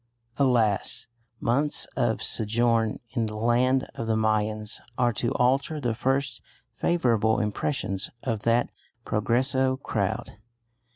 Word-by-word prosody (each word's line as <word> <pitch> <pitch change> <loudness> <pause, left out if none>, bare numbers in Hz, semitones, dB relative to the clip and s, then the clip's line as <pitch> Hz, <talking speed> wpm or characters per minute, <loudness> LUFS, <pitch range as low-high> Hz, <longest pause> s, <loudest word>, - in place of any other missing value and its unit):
Alas! 115 -7 +1 0.3
months 140 +6 +3
of - - 0
sojourn 115 0 +1
in 115 -3 -1
the 105 - -6
land 125 +4 +2
of 115 - -5
the 110 - +2
Mayans 110 0 0 0.2
are 120 -1 +2
to 120 +3 -1
alter 135 +5 +1
the 120 -5 -1
first 135 +1 -1 0.3
favourable 115 -8 +2
impressions 105 -2 -2
of 115 -4 -1
that 115 +3 +1 0.3
Progreso 130 +4 +1
crowd. 110 -3 -3
115 Hz, 115 wpm, -26 LUFS, 110-130 Hz, 0.3 s, months